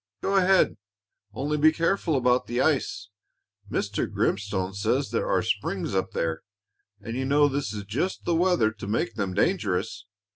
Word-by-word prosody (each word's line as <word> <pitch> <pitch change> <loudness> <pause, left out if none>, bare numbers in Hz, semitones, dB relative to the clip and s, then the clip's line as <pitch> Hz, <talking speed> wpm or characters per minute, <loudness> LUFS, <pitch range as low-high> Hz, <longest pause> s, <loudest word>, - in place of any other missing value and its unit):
"Go 195 - +1
ahead, 190 0 +4 0.5
only 145 +8 -2
be 155 +1 +6
careful 165 0 0
about 125 -1 +2
the 120 +1 -2
ice. 135 -8 0 0.6
Mr. - - -2
Grimstone 95 -2 -1
says 100 +1 0
there - - -1
are - - +2
springs - - -2
up - - 0
there, 80 -1 -1 0.6
and 115 +3 -6
you 130 - -1
know 145 +2 +4
this 140 -6 -2
is 105 -1 -5
just 125 - -3
the 170 - +1
weather 165 -10 +3
to 110 -2 -9
make 110 +2 -1
them 100 -4 -3
dangerous." 105 - 0
125 Hz, 160 wpm, -26 LUFS, 100-155 Hz, 0.6 s, be